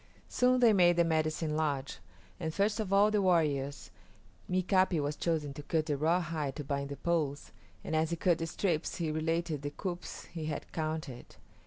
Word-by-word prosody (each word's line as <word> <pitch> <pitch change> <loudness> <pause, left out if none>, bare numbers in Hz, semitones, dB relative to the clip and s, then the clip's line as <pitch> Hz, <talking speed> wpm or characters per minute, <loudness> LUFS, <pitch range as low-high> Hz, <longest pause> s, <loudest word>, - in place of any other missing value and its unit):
Soon 255 0 +3
they 230 -3 +6
made 175 -3 +5
the 170 - +4
medicine 155 -1 0
lodge, 145 - -1 0.4
and 160 - -2
first 205 +6 +1
of 210 -3 -2
all 200 +2 +5
the 210 -1 +2
warriors, 150 -7 +1 0.6
Mika´pi 185 -1 +2
was 145 0 -1
chosen 155 -4 -1
to 145 - -7
cut 155 +1 0
the 150 -2 0
rawhide 155 -2 0
to 150 - -5
bind 140 0 -3
the 140 - -6
poles, 155 -5 -1 0.3
and 160 - -2
as 155 0 +2
he 170 - -1
cut 170 0 +2
the 165 - -2
strips 165 -1 -1
he 165 -3 -2
related 160 -1 -1
the 145 - -3
coups 180 +3 -6
he 160 -3 -4
had 155 - -5
counted. 155 -5 -4
160 Hz, 185 wpm, -31 LUFS, 150-175 Hz, 0.6 s, they